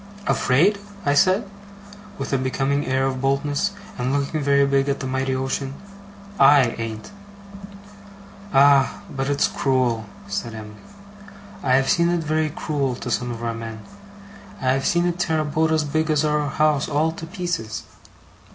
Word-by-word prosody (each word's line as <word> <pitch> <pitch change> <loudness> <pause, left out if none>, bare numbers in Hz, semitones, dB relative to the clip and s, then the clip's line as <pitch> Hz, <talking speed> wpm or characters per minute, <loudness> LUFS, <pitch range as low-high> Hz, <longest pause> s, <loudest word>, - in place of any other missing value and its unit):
'Afraid!' 180 +11 +3 0.3
I 145 - +3
said, 190 +7 +3 0.7
with - - -4
a - - +3
becoming 135 +2 -1
air 130 0 +1
of 130 -1 -2
boldness, 145 +8 0 0.3
and 125 +1 0
looking 145 +2 -1
very 140 0 +3
big 140 0 +1
at 140 - -1
the - - -5
mighty 130 0 -1
ocean. 135 +1 -3 0.6
'I 140 +1 +7 0.2
an't!' 110 - -5 1.4
'Ah! 140 -1 +4
but 135 0 -2
it's 145 0 +2
cruel,' 125 -5 0 0.2
said 110 +3 -4
Em'ly. 105 -1 -9 0.9
'I 130 - +1
have 135 0 +2
seen 170 0 +3
it 175 -1 0
very 155 0 0
cruel 145 -4 -2
to - - -6
some 125 0 -1
of 120 -1 -6
our 115 0 -1
men. 115 -1 -7 0.8
I 130 - 0
have 135 0 0
seen 175 0 +2
it 175 0 -1
tear 160 -2 +1
a 155 - 0
boat 160 +2 +1
as 160 -1 +2
big 155 +2 -1
as 155 0 +2
our 150 -1 +1
house, 150 0 +1
all 155 +2 +1
to 165 0 -8
pieces. 175 - -4
140 Hz, 165 wpm, -22 LUFS, 130-155 Hz, 1.4 s, I